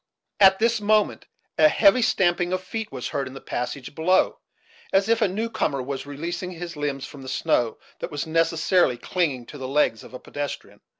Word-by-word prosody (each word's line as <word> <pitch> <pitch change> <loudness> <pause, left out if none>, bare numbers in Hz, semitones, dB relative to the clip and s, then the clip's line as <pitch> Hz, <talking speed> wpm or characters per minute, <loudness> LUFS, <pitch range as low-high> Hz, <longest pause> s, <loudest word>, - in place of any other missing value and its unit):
At 190 -1 +7
this 230 0 +1
moment, 210 0 +1 0.3
a 155 - +8
heavy 200 +9 +5
stamping 175 -5 +2
of 185 0 -2
feet 220 +3 -5
was 130 -2 -5
heard 140 -2 -2
in 130 - -10
the - - -7
passage 125 +3 -5
below, 165 +5 +2 0.5
as 195 +1 +3
if 230 +1 +2
a 215 - +4
new 210 +5 -2
comer 160 -11 -1
was 135 +1 -5
releasing 170 +5 -4
his 175 -1 -7
limbs 145 -2 -3
from 145 -2 -11
the 130 - -8
snow 120 -3 0 0.2
that - - -4
was 145 - -3
necessarily 165 -2 +2
clinging 140 -3 -1
to 145 - -11
the 130 - -4
legs 135 -5 +1
of - - -12
a - - -7
pedestrian. 145 0 -6
165 Hz, 195 wpm, -24 LUFS, 140-190 Hz, 0.5 s, a